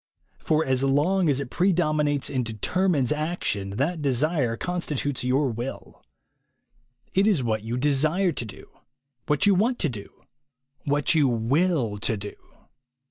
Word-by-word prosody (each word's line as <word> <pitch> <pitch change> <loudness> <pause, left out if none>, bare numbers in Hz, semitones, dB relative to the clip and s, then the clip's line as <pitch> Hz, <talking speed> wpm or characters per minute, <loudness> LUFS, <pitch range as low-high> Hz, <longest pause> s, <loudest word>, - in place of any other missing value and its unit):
For 155 0 +1
as 130 0 +1
long 155 +6 +2
as 140 -2 +2
it 140 -3 -5
predom 175 -5 +2
inates 145 -2 0
and 130 -2 0
determines 135 - 0
action, 150 - -2
that 155 +5 -1
desire 140 -2 +1
constitutes 150 -6 -3
your 130 +1 +1
will. 120 +4 -7 1.1
It 195 +2 +3
is 185 -12 +2
what 110 -2 -1
you 115 +3 -4
desire 155 +7 +2
to 130 - -4
do, 100 - -12 0.6
what 150 +7 +2
you 205 - +5
want 230 +7 +1
to 160 - 0
do, 105 -5 -10 0.6
what 145 +2 +2
you 150 -4 +4
will 125 - +1
to 110 +1 -1
do. 100 +1 -7
145 Hz, 145 wpm, -25 LUFS, 125-170 Hz, 1.1 s, you